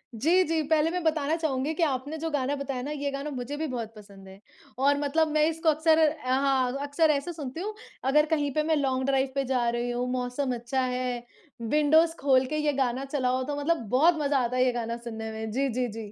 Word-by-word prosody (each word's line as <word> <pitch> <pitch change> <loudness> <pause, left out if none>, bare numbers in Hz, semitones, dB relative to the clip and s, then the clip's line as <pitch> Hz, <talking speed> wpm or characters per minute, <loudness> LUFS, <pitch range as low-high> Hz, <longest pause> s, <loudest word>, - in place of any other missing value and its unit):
जी, 335 +11 +3
जी, 325 0 0
पहले 315 +1 +3
मैं 360 0 -2
बताना 310 -1 +1
चाहूँगी 305 -2 -1
कि 330 - 0
आपने 285 +1 -1
जो 325 +1 -3
गाना 285 -1 0
बताया 275 -2 -4
ना, 285 +4 -5
ये 285 -1 -2
गाना 275 +2 -4
मुझे 265 +2 -5
भी 315 - -2
बहुत 235 -4 -5
पसंद 200 -2 -14
है। 190 +1 -13 0.4
और 280 +2 +3
मतलब 305 +2 +1
मैं 305 0 +3
इसको 325 0 0
अक्सर 315 +1 +3
अ, 300 -4 +1
हाँ 265 -1 +2
अक्सर 285 +3 +2
ऐसे 295 +4 -2
सुनती 295 -2 -6
हूँ, 425 +3 -4 0.3
अगर 300 +3 +4
कहीं 295 -2 0
पे 305 - +1
मैं 315 +1 +1
लॉन्ग 265 -3 0
ड्राइव 270 0 +1
पे 275 - +1
जा 250 -2 0
रही 240 +1 -2
हूँ, 245 +1 -2
मौसम 250 +1 -2
अच्छा 240 +3 -2
है, 250 -1 -2 0.4
विंडोज़ 305 +6 +3
खोल 265 -2 +3
के 305 +4 -3
ये 300 -1 +1
गाना 260 -1 0
चलाओ 260 -2 0
तो 290 +2 -3
मतलब 300 +4 +1
बहुत 315 +9 +4
मज़ा 285 -1 +1
आता 250 0 -1
है 255 - +4
ये 255 - +3
गाना 235 -1 -3
सुनने 225 -2 -6
में। 220 0 -5
जी, 270 +5 0
जी, 250 +1 -1
जी, 215 -1 -8
275 Hz, 230 wpm, -27 LUFS, 250-305 Hz, 0.4 s, अगर